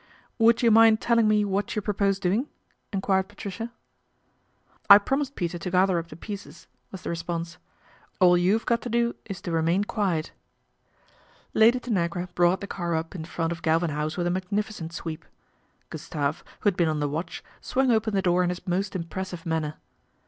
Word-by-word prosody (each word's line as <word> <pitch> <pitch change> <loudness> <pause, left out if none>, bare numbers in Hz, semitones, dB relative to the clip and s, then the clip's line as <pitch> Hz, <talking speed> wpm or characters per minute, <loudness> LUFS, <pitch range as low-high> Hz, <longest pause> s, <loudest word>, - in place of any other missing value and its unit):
Would 230 +1 +4
you 230 - +5
mind 225 0 +6
telling 230 -2 +3
me 210 -1 +3
what 200 0 -1
you 210 - 0
propose 200 -1 +1
doing? 200 +8 0 0.2
" - - -43
enquired 190 -1 +1
Patricia. 205 +3 -7 0.6
" - - -38
I 200 - +12
promised 270 +6 -1
Peter 175 -1 -3
to 180 - -4
gather 185 0 +3
up 165 - -7
the 155 - -11
pieces/' 200 +4 -9 0.3
was 190 - -9
the - - -3
response. 170 0 -4 0.6
"All 180 -2 +6
you've 190 +6 +2
got 235 -1 +1
to 245 - -5
do 235 0 +1
is 195 -3 -7
to 175 - -5
remain 165 +4 +2
quiet." 190 -7 -1 1.2
Lady 235 +3 +5
Tanagra 180 -6 -2
brought 175 +2 +3
the - - -4
car 175 -4 -3
up 160 +1 -3
in 165 -4 -6
front 165 0 -2
of 170 0 -5
Galvin 165 +1 +1
House 150 +2 -3
with 175 - 0
a 175 - +1
magnificent 190 -1 -3
sweep. 165 -1 -6 0.7
Gustave, - - -3 0.2
who - - 0
had 200 - +3
been 170 -3 +2
on 155 -1 -1
the 145 - 0
watch, 155 +5 -5 0.2
swung 260 -1 +1
open 220 -2 +1
the 195 - +1
door 180 0 +3
in 175 - +1
his 180 +1 -5
most 190 +2 -1
impressive 180 +1 -5
manner. 160 -2 -1
185 Hz, 190 wpm, -26 LUFS, 170-210 Hz, 1.2 s, I